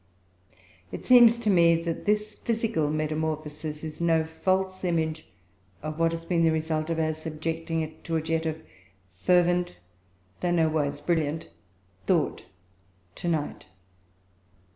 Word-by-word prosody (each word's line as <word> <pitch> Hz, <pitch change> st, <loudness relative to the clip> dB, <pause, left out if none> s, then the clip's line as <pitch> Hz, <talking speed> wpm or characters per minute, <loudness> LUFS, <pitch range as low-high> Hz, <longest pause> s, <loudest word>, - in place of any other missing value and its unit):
It -, -, -7 dB
seems 240 Hz, -2 st, +7 dB
to 225 Hz, -3 st, +1 dB
me 170 Hz, -2 st, +5 dB
that 165 Hz, -1 st, -3 dB
this 210 Hz, 0 st, +1 dB
physical 225 Hz, -9 st, -1 dB
metamorphosis 155 Hz, 0 st, -3 dB
is 155 Hz, +1 st, -6 dB
no 165 Hz, -1 st, +3 dB
false 185 Hz, +4 st, -1 dB
image 160 Hz, -3 st, -1 dB, 0.6 s
of 155 Hz, +1 st, -5 dB
what 165 Hz, 0 st, +3 dB
has 165 Hz, 0 st, -5 dB
been 170 Hz, -1 st, +1 dB
the 165 Hz, -, +5 dB
result 160 Hz, 0 st, -1 dB
of 165 Hz, -, -1 dB
our 155 Hz, -1 st, +1 dB
subjecting 160 Hz, +1 st, -3 dB
it 155 Hz, 0 st, -7 dB
to 165 Hz, -, -2 dB
a 160 Hz, -, +1 dB
jet 160 Hz, 0 st, -1 dB
of 160 Hz, 0 st, -4 dB, 0.5 s
fervent, 175 Hz, -, +2 dB, 0.6 s
though 180 Hz, -, -1 dB
nowise 155 Hz, -4 st, +1 dB
brilliant, 155 Hz, -, -1 dB, 0.6 s
thought -, -, +1 dB, 0.7 s
to 175 Hz, -, -6 dB
night. 160 Hz, -4 st, -2 dB
160 Hz, 135 wpm, -27 LUFS, 155-175 Hz, 0.7 s, seems